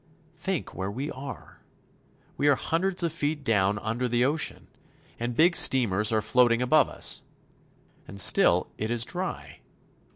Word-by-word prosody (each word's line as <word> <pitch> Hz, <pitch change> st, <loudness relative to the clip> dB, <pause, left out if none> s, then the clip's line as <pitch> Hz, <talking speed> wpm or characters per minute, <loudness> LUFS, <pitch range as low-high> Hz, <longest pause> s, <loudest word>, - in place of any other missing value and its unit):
Think 175 Hz, +1 st, -4 dB
where 95 Hz, +1 st, -4 dB
we 130 Hz, +8 st, -5 dB
are! 135 Hz, +1 st, -10 dB, 0.8 s
We 145 Hz, -, 0 dB
are 140 Hz, -, +4 dB
hundreds 180 Hz, +6 st, -1 dB
of 165 Hz, -2 st, -1 dB
feet 150 Hz, -2 st, -3 dB
down 105 Hz, -5 st, +1 dB
under 115 Hz, +5 st, -3 dB
the 120 Hz, +1 st, +1 dB
ocean, 150 Hz, +3 st, -2 dB, 0.5 s
and 120 Hz, +1 st, -4 dB
big 175 Hz, +2 st, +4 dB
steamers 110 Hz, -4 st, +4 dB
are 110 Hz, -1 st, 0 dB
floating 120 Hz, +1 st, +3 dB
above 140 Hz, +4 st, +3 dB
us. -, -, 0 dB, 0.9 s
And 100 Hz, -, -6 dB
still -, -, +3 dB
it 110 Hz, -, -3 dB
is 120 Hz, 0 st, +2 dB
dry. 185 Hz, +5 st, -6 dB
125 Hz, 150 wpm, -26 LUFS, 110-155 Hz, 0.9 s, are